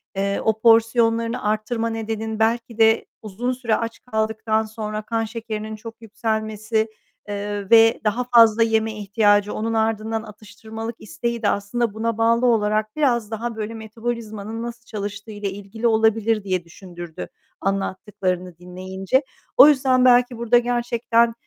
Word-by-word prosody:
eee, 200 Hz, 0 st, -1 dB
o 220 Hz, 0 st, +1 dB
porsiyonlarını 230 Hz, 0 st, +3 dB
arttırma 215 Hz, +2 st, -1 dB
nedenin, 220 Hz, 0 st, -4 dB
belki 230 Hz, 0 st, 0 dB
de 225 Hz, 0 st, +4 dB, 0.2 s
uzun 225 Hz, +4 st, -3 dB
süre 240 Hz, -3 st, 0 dB
aç 230 Hz, 0 st, -4 dB
kaldıktan 220 Hz, 0 st, 0 dB
sonra 215 Hz, -1 st, -5 dB
kan 225 Hz, +1 st, -2 dB
şekerinin 220 Hz, -1 st, -5 dB
çok 225 Hz, +1 st, -11 dB
yükselmesi, 220 Hz, 0 st, -2 dB, 0.4 s
eee, 205 Hz, -1 st, -4 dB
ve 225 Hz, 0 st, +6 dB
daha 220 Hz, +4 st, 0 dB
fazla 230 Hz, -2 st, +5 dB
yeme 225 Hz, -1 st, +1 dB
ihtiyacı, 205 Hz, 0 st, +2 dB
onun 225 Hz, +1 st, -2 dB
ardından 220 Hz, 0 st, -1 dB
atıştırmalık 220 Hz, +2 st, -8 dB
isteği 235 Hz, +2 st, -4 dB
de 210 Hz, -, +2 dB
aslında 205 Hz, +2 st, -1 dB
buna 225 Hz, +1 st, -2 dB
bağlı 230 Hz, +2 st, +3 dB
olarak 215 Hz, -2 st, +1 dB
biraz 240 Hz, -7 st, +1 dB
daha 230 Hz, +1 st, -4 dB
böyle 220 Hz, +1 st, -4 dB
metabolizmanın 220 Hz, -1 st, -5 dB
nasıl 235 Hz, 0 st, -7 dB
çalıştığıyla 205 Hz, -1 st, -5 dB
ilgili 205 Hz, +4 st, -4 dB
olabilir, 220 Hz, -1 st, +2 dB
diye 185 Hz, -2 st, -1 dB
düşündürdü 175 Hz, -1 st, -9 dB, 0.3 s
anlattıklarını 185 Hz, -2 st, -2 dB
dinleyince. 185 Hz, +7 st, -2 dB, 0.3 s
O 265 Hz, -, +10 dB
yüzden 260 Hz, -3 st, +4 dB
belki 245 Hz, -1 st, +4 dB
burada 235 Hz, +1 st, +3 dB
gerçekten, 235 Hz, -1 st, +1 dB
220 Hz, 135 wpm, -22 LUFS, 210-230 Hz, 0.4 s, O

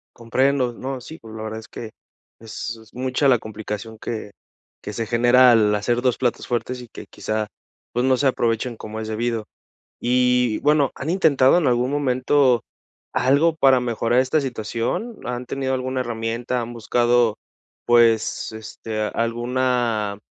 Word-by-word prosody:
Comprendo, 125 Hz, +2 st, +1 dB
no, 130 Hz, +2 st, -5 dB
sí, 160 Hz, +6 st, -11 dB
pues, 110 Hz, -1 st, -12 dB
la 110 Hz, -, -6 dB
verdad 110 Hz, 0 st, -5 dB
es 110 Hz, -, -13 dB
que 110 Hz, -2 st, -8 dB, 0.5 s
es 115 Hz, +1 st, -6 dB
es 110 Hz, -, -20 dB
mucha 130 Hz, +3 st, 0 dB
la 125 Hz, -3 st, +4 dB
complicación 110 Hz, 0 st, -7 dB
que 110 Hz, -2 st, -5 dB, 0.5 s
que 105 Hz, -, -6 dB
se 115 Hz, +2 st, -2 dB
genera 120 Hz, +2 st, +5 dB
al 110 Hz, -3 st, +4 dB
hacer 120 Hz, +4 st, 0 dB
2 125 Hz, -1 st, +1 dB
platos 125 Hz, -2 st, -1 dB
fuertes, 125 Hz, +1 st, -2 dB
y 120 Hz, -, -10 dB
que, -, -, -10 dB
quizá, 110 Hz, 0 st, -3 dB, 0.5 s
pues 125 Hz, -, 0 dB
no 130 Hz, 0 st, +3 dB
se 140 Hz, -, 0 dB
aprovechen 120 Hz, -1 st, 0 dB
como 110 Hz, 0 st, -7 dB
es 110 Hz, -, -5 dB
debido. 110 Hz, 0 st, -2 dB, 0.6 s
Y 125 Hz, -2 st, +2 dB
bueno, 145 Hz, -2 st, +3 dB
¿han 145 Hz, -, -4 dB
intentado 160 Hz, -5 st, +4 dB
en 165 Hz, -, +1 dB
algún 125 Hz, 0 st, +2 dB
momento, 130 Hz, -3 st, +2 dB, 0.5 s
algo 140 Hz, +6 st, +3 dB
para 135 Hz, -4 st, +5 dB
mejorar 120 Hz, 0 st, +1 dB
esta 130 Hz, +4 st, +1 dB
situación? 120 Hz, -, -3 dB
¿Han 125 Hz, 0 st, -4 dB
tenido 130 Hz, +1 st, -2 dB
alguna 130 Hz, 0 st, -2 dB
herramienta? 120 Hz, +1 st, -2 dB
¿Han 120 Hz, 0 st, -5 dB
buscado, 120 Hz, -1 st, +2 dB, 0.5 s
pues, 115 Hz, -2 st, +3 dB
este, 110 Hz, 0 st, -6 dB
alguna, 115 Hz, -2 st, -1 dB
120 Hz, 155 wpm, -22 LUFS, 115-130 Hz, 0.6 s, genera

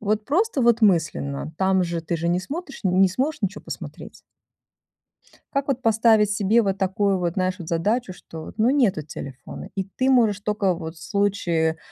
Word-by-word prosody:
Вот 215 Hz, 0 st, 0 dB
просто, 350 Hz, 0 st, +1 dB
вот, 235 Hz, 0 st, +4 dB
мысленно, 160 Hz, -7 st, +1 dB
там 190 Hz, -1 st, +3 dB
же 170 Hz, -1 st, -2 dB
ты 165 Hz, +1 st, -2 dB
же 170 Hz, +1 st, -2 dB
не 175 Hz, -, +2 dB
смотришь 280 Hz, -, -7 dB
н-не 185 Hz, +1 st, +4 dB
сможешь 260 Hz, +7 st, -2 dB
ничего 195 Hz, -, -2 dB
посмотреть. -, -, -8 dB, 1.4 s
Как 275 Hz, 0 st, -1 dB
вот 260 Hz, -2 st, 0 dB
поставить 220 Hz, -2 st, +4 dB
себе 210 Hz, +2 st, +3 dB
вот 195 Hz, -2 st, 0 dB
такую 195 Hz, 0 st, +1 dB
вот 175 Hz, 0 st, -2 dB
нашу 185 Hz, -2 st, -1 dB
задачу, 195 Hz, +6 st, 0 dB
что, 160 Hz, -2 st, -10 dB
вот, -, -, -10 dB
ну 220 Hz, +3 st, +4 dB
нету 245 Hz, -, +2 dB
телефона, 140 Hz, -2 st, -9 dB
и 190 Hz, -1 st, -2 dB
ты 255 Hz, +7 st, -1 dB
можешь 225 Hz, -6 st, +3 dB
только, 205 Hz, -3 st, 0 dB
вот, 160 Hz, -1 st, -7 dB
в -, -, -14 dB
случае 175 Hz, -6 st, 0 dB
195 Hz, 175 wpm, -23 LUFS, 175-225 Hz, 1.4 s, вот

